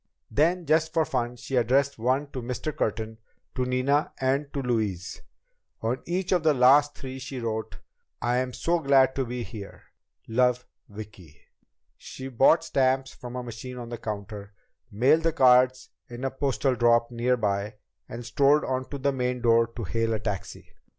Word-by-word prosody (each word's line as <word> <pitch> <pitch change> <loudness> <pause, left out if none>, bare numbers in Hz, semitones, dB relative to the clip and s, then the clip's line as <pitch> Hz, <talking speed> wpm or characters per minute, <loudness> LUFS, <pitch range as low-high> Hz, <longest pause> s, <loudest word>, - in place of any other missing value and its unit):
Then, 170 +4 +2
just 155 +1 +2
for 160 -1 +3
fun, 120 -3 -2
she 130 +2 -5
addressed 130 +3 +2
one 130 +5 +1
to 130 - -5
Mr. 125 +5 -4
Curtin, 110 +1 -3 0.3
to 125 - -1
Nina 130 +4 +1
and 135 +2 0
to 140 - -3
Louise. 105 -8 -2 0.6
On 115 +3 -1
each 180 +2 -2
of 180 -3 +3
these 155 -2 +3
last 140 +4 +5
three, 130 0 -7
she 130 0 -6
wrote: 110 -2 -4 0.4
"I'm 125 +1 0
so 170 +7 0
glad 135 -3 +4
to 135 - -1
be 125 0 -4
here. 105 -4 -10 0.4
Love, 125 +2 +2 0.2
Vicki." 100 -7 -11 0.6
She 130 0 -8
bought 135 +6 +4
stamps 135 0 +1
from 125 -1 -9
a 125 - -4
machine 120 +2 -8
on 120 -1 -7
the 120 -1 -6
counter, 100 -2 -7 0.4
mailed 130 +10 +3
the 165 -1 +1
cards 130 -2 +4 0.2
in 120 +1 -8
a 135 - -1
postal 135 -1 0
drop 120 0 +3
nearby, 110 -4 0 0.3
and 120 +1 -7
strolled 140 +5 +3
on 130 0 -2
to 140 - -5
the 140 +1 0
main 125 -1 -2
door 115 -1 +4
to 115 +1 -8
hail 115 +2 -1
a - - -3
taxi. 105 -2 -6
125 Hz, 170 wpm, -26 LUFS, 115-135 Hz, 0.6 s, last